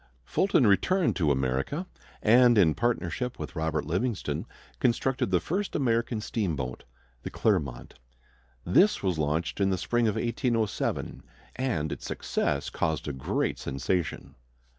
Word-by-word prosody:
Fulton 170 - +2
returned 175 - +3
to 80 -5 +2
America, 65 - 0 0.4
and 120 +1 +6
in 85 -6 +5
partnership 120 +2 -1
with - - -7
Robert 80 -2 -1
Livingston 90 - -2 0.3
constructed 125 0 +1
the 90 -1 +3
first 195 - -3
American 115 -4 0
steamboat, 75 - -3 0.4
the - - -5
Clermont. 70 - -1 0.7
This 185 - +4
was 90 -5 0
launched 75 +5 -1
in 95 - +3
the 95 - +1
spring 120 +5 +1
of 105 - 0
1807, 115 -2 -1 0.3
and 115 - -1
its - - -6
success - - -1
caused 80 -1 -1
a 75 - -2
great 65 - -1
sensation. 70 +6 -2
100 Hz, 130 wpm, -28 LUFS, 80-120 Hz, 0.7 s, and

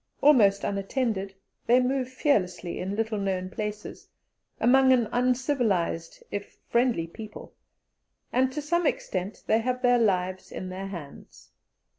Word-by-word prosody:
Almost 210 -9 +5
unattended, 200 -1 -2 0.3
they 245 +2 +6
move 255 0 0
fearlessly 185 - 0
in 190 +2 -3
little 220 -1 -1
known 185 -2 -2
places, 210 +1 -6 0.5
among 260 +3 +5
an 240 -3 +4
uncivilized 245 - 0
if 205 0 -6
friendly 235 -8 +2
people, 215 +5 -10 0.8
and 260 +1 +3
to 295 +2 -4
some 345 +2 +1
extent 185 -4 -3
they 220 - +3
have 250 +2 -2
their 245 -1 +5
lives 185 -4 0
in 185 - -6
their 190 +1 -5
hands. 150 - -10
215 Hz, 130 wpm, -27 LUFS, 190-255 Hz, 0.8 s, they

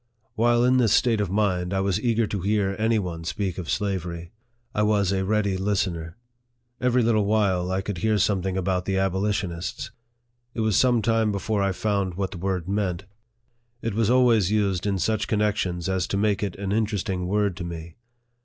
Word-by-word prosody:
While 120 0 +3
in 125 +1 +4
this 120 -5 +3
state 115 -4 +3
of 100 - -1
mind, 95 -2 0
I - - +1
was 95 +1 0
eager 115 -1 +2
to 100 -2 -4
hear 100 0 0
any 110 +1 +2
one 85 -5 -4
speak 90 +3 -3
of 85 - -6
slavery. 85 -4 -3 0.4
I 105 - 0
was 105 -3 +2
a 95 -1 0
ready 100 -1 0
listener. 90 -4 -2 0.6
Every 125 0 +2
little 110 -2 +2
while, 100 -4 +1
I 95 +1 0
could 100 -3 -4
hear 110 +3 +2
something 95 -1 0
about 90 -1 -1
the 95 -1 0
abolitionists. 95 -2 -2 0.6
It 115 - -1
was 110 -2 +1
some 120 -3 +3
time 115 -1 +2
before 100 +1 -1
I 100 0 +1
found 100 -2 -1
what 95 0 -2
the 90 - -7
word 90 -2 -2
meant. 95 -3 -1 0.8
It 115 - -1
was 110 0 +1
always 120 -6 +4
used 100 -3 0
in 100 -1 0
such 110 +4 0
connections 105 -5 0
as 95 -2 0
to 100 - -2
make 105 -1 +1
it 100 -4 -2
an 100 0 -4
interesting 100 -4 -1
word 100 -1 +1
to 90 - -5
me. 85 -1 -7
100 Hz, 190 wpm, -25 LUFS, 90-110 Hz, 0.8 s, in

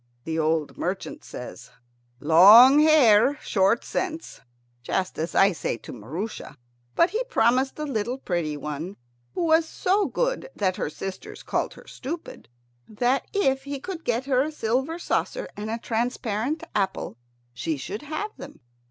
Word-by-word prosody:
The 160 0 -3
old 155 -1 0
merchant 195 - -4
says, 125 - -9 0.5
"Long 210 - +8
hair, 285 -4 +5
short 195 0 +1
sense," 330 -3 -4 0.4
just 185 +9 -2
as 160 +2 -3
I 195 +1 +5
say 160 - -3
to - - -10
Maroosia; 155 - -6 0.4
but 340 - +4
he 460 +3 -1
promised 260 - +2
the 305 - -4
little 245 -2 -2
pretty 170 - -2
one, 150 +6 -6 0.4
who - - -1
was 320 0 +3
so 390 +2 +1
good - - -2
that 185 -2 0
her - - -2
sisters 190 +4 -8
called - - -2
her - - -15
stupid, 310 - -8 0.4
that 245 +5 0
if 270 -9 +1
he 280 -1 -4
could 345 +2 -7
get 240 +2 -1
her 260 -2 +2
a 300 +3 -1
silver 265 +4 -1
saucer - - -2
and 210 +1 -5
a 225 - -2
transparent 235 +4 -2
apple 195 - -2 0.4
she 145 +5 -3
should 200 +10 -6
have 310 +8 -4
them. - - -11
235 Hz, 150 wpm, -25 LUFS, 185-300 Hz, 0.5 s, Long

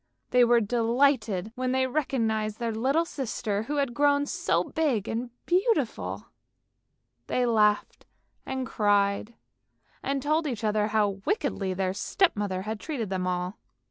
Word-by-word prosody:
They 250 0 +6
were 240 0 +5
delighted 230 -2 +1
when 255 0 -1
they 260 0 +2
recognised 225 -6 -1
their 235 -1 -2
little 270 +9 +1
sister 220 -8 -3
who 285 +7 -4
had 275 -4 0
grown 285 +2 +3
so - - 0
big 270 - -1
and 235 +2 -3 0.2
beautiful. 390 +6 0 1.0
They 250 - +1
laughed 210 -3 +1 0.4
and 265 -1 -3
cried, 205 0 +1 0.7
and 275 0 -1
told 305 +3 +1
each 235 -6 -4
other 210 -1 +1
how 205 -2 0
wickedly 215 - -1
their 185 0 0
step 360 - +1
mother 195 -3 -2
had 215 +1 -4
treated 240 - -4
them 185 -1 -1
all. 180 +2 -2
230 Hz, 140 wpm, -27 LUFS, 210-275 Hz, 1.0 s, They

